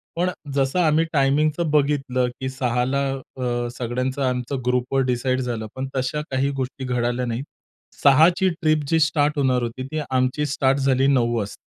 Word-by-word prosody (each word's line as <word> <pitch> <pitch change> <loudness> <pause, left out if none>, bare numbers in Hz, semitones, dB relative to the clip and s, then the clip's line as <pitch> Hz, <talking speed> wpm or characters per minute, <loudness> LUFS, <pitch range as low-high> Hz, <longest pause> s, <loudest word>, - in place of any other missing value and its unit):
पण 175 +2 +1 0.2
जसं 135 +5 +1
आम्ही 160 -1 +3
टायमिंगचं 150 +3 +2
बघितलं 135 -4 +1
की 130 0 -3
6 125 -2 -1
ला 140 +2 0 0.4
अ, 120 -1 -1
सगळ्यांचं 125 +3 -2
आमचं 125 +2 -3
ग्रुपवर 125 +2 +1
डिसाईड 130 +1 0
झालं, 115 -3 -3
पण 130 0 -3
तशा 130 +3 -1
काही 135 +1 +1
गोष्टी 130 +1 -5
घडल्या 120 0 -1
नाहीत. 120 +2 -3 0.6
6 145 +3 +7
ची 190 - +2
ट्रिप 155 -3 0
जी 165 +1 +2
स्टार्ट 150 -1 +2
होणार 130 -3 +2
होती 120 +2 -4
ती 155 +2 -3
आमची 130 +3 +1
स्टार्ट 135 -1 +1
झाली 135 0 +2
9 120 -4 +2
वाजता. 105 -2 -4
130 Hz, 170 wpm, -22 LUFS, 125-145 Hz, 0.6 s, 6